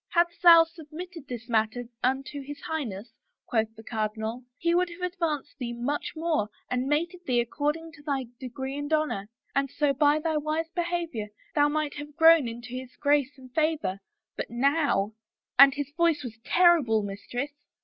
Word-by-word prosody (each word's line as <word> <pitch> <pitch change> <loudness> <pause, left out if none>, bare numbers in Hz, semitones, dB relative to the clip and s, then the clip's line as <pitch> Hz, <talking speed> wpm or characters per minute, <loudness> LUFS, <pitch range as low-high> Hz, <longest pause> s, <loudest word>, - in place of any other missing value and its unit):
* - - -61
Hadst 345 0 +2
thou 335 -2 +9
submitted 330 0 -10
this 240 -2 -6
matter 225 +1 +1 0.2
unto 270 +3 -1
his 285 +1 -8
Highness,' 235 -8 -4 0.3
quoth 220 -1 0
the 220 - -12
cardinal, 220 +2 -3
* - - -57
he 340 0 +1
would 360 +1 +2
have 360 +1 -4
advanced 310 -6 -2
thee 240 -2 -3
much 250 +5 -2
more 315 -10 0 0.2
and 250 +1 0
mated 340 +5 0
thee 245 -2 +3
according 300 +7 -1
to 320 - -15
thy 280 -3 -2
degree 265 +1 -5
and 290 +1 -4
honor, 305 -11 0 0.2
and 275 0 +1
so 290 +1 +1
by 290 +2 +4
thy 315 0 0
wise 310 +2 -1
behavior 340 - -2 0.3
thou 290 -1 +4
;night 300 -1 -1
have 295 0 -8
grown 325 -4 +7
into 235 +1 -7
his 255 +1 -7
grace 285 -1 +1
and 255 -1 -15
favor. 310 -11 0 0.4
But - - -4
now 270 -4 +1
' - - -65
— - - -42
and 275 0 +11
his 285 -1 -4
voice 330 -3 +2
was 225 -3 -8
terrible, 315 - +4
mistress! 215 +8 -4
290 Hz, 180 wpm, -27 LUFS, 245-320 Hz, 0.4 s, and